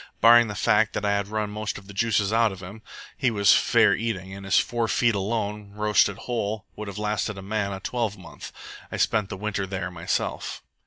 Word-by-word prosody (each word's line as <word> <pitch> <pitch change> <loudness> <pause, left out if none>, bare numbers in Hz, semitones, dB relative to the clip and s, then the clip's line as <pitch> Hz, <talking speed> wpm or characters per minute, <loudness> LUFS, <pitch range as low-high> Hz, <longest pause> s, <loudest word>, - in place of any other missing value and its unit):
Barring 120 +1 +7
the 105 - -5
fact 105 +1 +2
that 105 - -2
I 100 - +2
had 100 -1 0
run 105 0 -2
most 105 -1 -4
of 100 - -12
the 100 - -11
juices 105 -1 +1
out 115 -1 +3
of 95 - -9
him, 100 +5 -9 0.3
he 130 - +1
was 100 -4 +4
fair - - +4
eating, 95 -4 -3
and 100 0 -9
his 95 - +3
four 120 -1 +1
feet, 115 +1 +2
alone, 105 0 -3
roasted 105 -2 +2
whole, 110 -4 -3
would 105 - -7
have 100 0 -7
lasted 105 -1 -2
a 95 - -8
man 100 0 -2
a 95 - -5
twelvemonth. 105 -5 -5 0.4
I - - -4
spent 105 -3 +1
the 100 - -5
winter 100 -1 -3
there 95 -1 -4
myself." 85 0 -3
105 Hz, 210 wpm, -25 LUFS, 100-110 Hz, 0.4 s, Barring